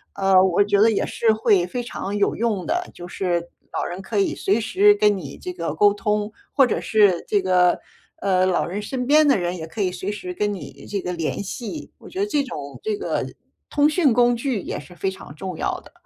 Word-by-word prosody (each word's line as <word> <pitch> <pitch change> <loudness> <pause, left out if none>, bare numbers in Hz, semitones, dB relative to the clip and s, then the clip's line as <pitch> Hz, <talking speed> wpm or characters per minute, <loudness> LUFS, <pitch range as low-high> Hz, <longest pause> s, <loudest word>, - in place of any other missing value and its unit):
呃， 195 -1 +5
我 190 +1 +3
觉 205 0 +2
得 225 +1 +6
也 210 - 0
是 225 - +1
会 215 -4 +3
非 245 +7 -4
常 205 -4 -4
有 200 - +1
用 215 -5 -1
的。 355 +2 -1
就 175 - -9
是 175 -2 -2 0.2
老 - - -2
人 180 +2 -5
可 205 +2 -2
以 195 - +1
随 200 +4 +1
时 395 - +4
跟 210 - +3
你 145 -7 -8
这 180 - -6
个 165 -3 -3
沟 205 +5 +4
通， 210 0 -1 0.2
或 270 -3 +4
者 - - -1
是 205 -5 +3
这 205 - +3
个， 180 -1 +3 0.4
呃， 185 -1 +2
老 185 -1 +1
人 195 +4 -4
身 250 +4 -4
边 305 +2 +6
的 280 -7 +4
人 175 0 -2
也 160 -3 -6
可 160 +7 -11
以 195 -3 +2
随 185 +3 -4
时 185 -3 -6
跟 205 +3 -1
你 195 - -9
这 200 - -2
个 180 -1 -4
联 165 +1 -2
系， 235 - -6
我 - - -13
觉 375 - -6
得 400 - +2
这 295 -8 +1
种 145 - -7
这 430 -1 -1
个 410 - -2 0.4
通 295 0 +3
讯 305 -5 +3
工 240 +1 +4
具 235 -4 -2
也 - - -5
是 160 +5 -13
非 190 - -1
常 165 - -11
重 180 +2 -6
要 - - -2
的。 - - -18
205 Hz, 250 characters per minute, -22 LUFS, 180-235 Hz, 0.4 s, 得